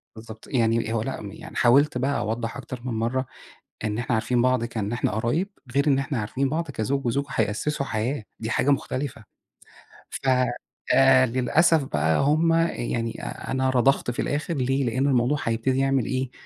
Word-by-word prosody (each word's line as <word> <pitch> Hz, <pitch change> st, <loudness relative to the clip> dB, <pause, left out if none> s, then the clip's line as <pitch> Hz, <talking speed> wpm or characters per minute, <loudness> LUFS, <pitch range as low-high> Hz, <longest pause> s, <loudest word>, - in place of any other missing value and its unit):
بالضبط، 110 Hz, 0 st, -11 dB
يعني 115 Hz, -2 st, +1 dB
هو 115 Hz, -, 0 dB
لأ، 135 Hz, +4 st, -4 dB
يعني -, -, -11 dB
حاولت 130 Hz, +3 st, +4 dB
بقى 135 Hz, +3 st, 0 dB
أوضّح 115 Hz, +1 st, -3 dB
أكتر 125 Hz, -2 st, -7 dB
من 125 Hz, -, -2 dB
مرَّة 120 Hz, +4 st, -1 dB, 0.6 s
إن 105 Hz, 0 st, -1 dB
إحنا 120 Hz, +1 st, -1 dB
عارفين 120 Hz, +2 st, +1 dB
بعض، 130 Hz, -1 st, +2 dB
كإن 110 Hz, -3 st, -3 dB
إحنا 120 Hz, -, 0 dB
قرايب، 120 Hz, -, 0 dB, 0.3 s
غير 140 Hz, +2 st, +2 dB
إن 135 Hz, -2 st, +4 dB
إحنا 135 Hz, -1 st, -2 dB
عارفين 130 Hz, +6 st, -1 dB
بعض 160 Hz, +2 st, -2 dB
كزوج 135 Hz, +2 st, -2 dB
وزوجة 140 Hz, +4 st, 0 dB
هيأسّسوا 135 Hz, +4 st, -1 dB
حياة 115 Hz, +4 st, -2 dB, 0.2 s
دي 110 Hz, 0 st, -3 dB
حاجة 145 Hz, -, +2 dB
مختلِفة. 135 Hz, -3 st, -2 dB, 0.9 s
ف -, -, -5 dB, 0.7 s
آآ 130 Hz, -1 st, +6 dB
للأسف 145 Hz, +6 st, +3 dB
بقى، 80 Hz, -, +1 dB
هُم 155 Hz, +4 st, +3 dB, 0.2 s
يعني 115 Hz, -1 st, -3 dB
أ -, -, -6 dB
أنا 130 Hz, 0 st, +1 dB
رضَخت 130 Hz, 0 st, +2 dB
في 120 Hz, -, -3 dB
الآخِر 150 Hz, +4 st, -2 dB
ليه؟ 135 Hz, 0 st, 0 dB
لأنه 130 Hz, +4 st, +1 dB
الموضوع 130 Hz, +2 st, +2 dB
هيبتدي 115 Hz, +3 st, 0 dB
يعمل 135 Hz, -2 st, +2 dB
إيه، 130 Hz, -1 st, -2 dB
130 Hz, 170 wpm, -25 LUFS, 115-135 Hz, 0.9 s, آآ